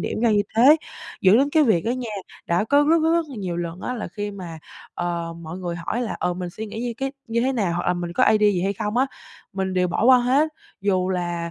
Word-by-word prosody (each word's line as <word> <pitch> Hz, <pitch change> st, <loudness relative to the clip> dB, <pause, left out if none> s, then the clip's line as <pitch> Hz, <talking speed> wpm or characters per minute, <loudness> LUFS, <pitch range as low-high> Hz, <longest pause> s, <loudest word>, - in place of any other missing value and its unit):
điểm -, -, -3 dB
ra 235 Hz, -1 st, +3 dB
như 205 Hz, -1 st, +3 dB
thế? 265 Hz, +7 st, +7 dB, 0.4 s
Dẫn 190 Hz, +4 st, +6 dB
đến 280 Hz, +2 st, +2 dB
cái 315 Hz, +1 st, +4 dB
việc 215 Hz, -, +2 dB
đó 230 Hz, -, 0 dB
nha, 245 Hz, -2 st, -3 dB, 0.4 s
đã 170 Hz, +4 st, +1 dB
có 285 Hz, +6 st, +3 dB
rất 320 Hz, +3 st, +4 dB
rất 320 Hz, +1 st, +3 dB
rất 335 Hz, -1 st, +1 dB
là 275 Hz, -, -9 dB
nhiều 180 Hz, -4 st, -3 dB
lần 170 Hz, +1 st, -4 dB
á 250 Hz, -, -3 dB
là 225 Hz, -, -5 dB
khi 205 Hz, -1 st, -5 dB
mà, 180 Hz, -5 st, -8 dB, 0.4 s
ờ, 170 Hz, -1 st, -3 dB
mọi 165 Hz, +2 st, -7 dB
người 175 Hz, -2 st, -4 dB
hỏi 175 Hz, +8 st, -3 dB
là, 230 Hz, -, -3 dB
ờ, 180 Hz, -, -1 dB
mình 180 Hz, 0 st, -5 dB
suy 220 Hz, +5 st, -7 dB
nghĩ 215 Hz, +2 st, -6 dB
như 240 Hz, 0 st, -2 dB
cái 270 Hz, +2 st, -3 dB
như 230 Hz, 0 st, 0 dB
thế 260 Hz, +3 st, +1 dB
nào, 205 Hz, -9 st, 0 dB
hoặc 175 Hz, -, -3 dB
là 180 Hz, -, +2 dB
mình 175 Hz, -1 st, -4 dB
có -, -, +3 dB
idea 210 Hz, -1 st, +4 dB
gì 180 Hz, -3 st, -1 dB
hay 195 Hz, +1 st, 0 dB
không 210 Hz, +1 st, -3 dB
á, 260 Hz, +2 st, +3 dB, 0.5 s
mình 190 Hz, -1 st, -2 dB
đều 180 Hz, -1 st, +2 dB
bỏ 175 Hz, -, -1 dB
qua 255 Hz, +1 st, +7 dB
hết, 260 Hz, +6 st, +2 dB, 0.3 s
dù 185 Hz, -2 st, +1 dB
là 175 Hz, -2 st, -2 dB
205 Hz, 270 wpm, -23 LUFS, 175-245 Hz, 0.5 s, thế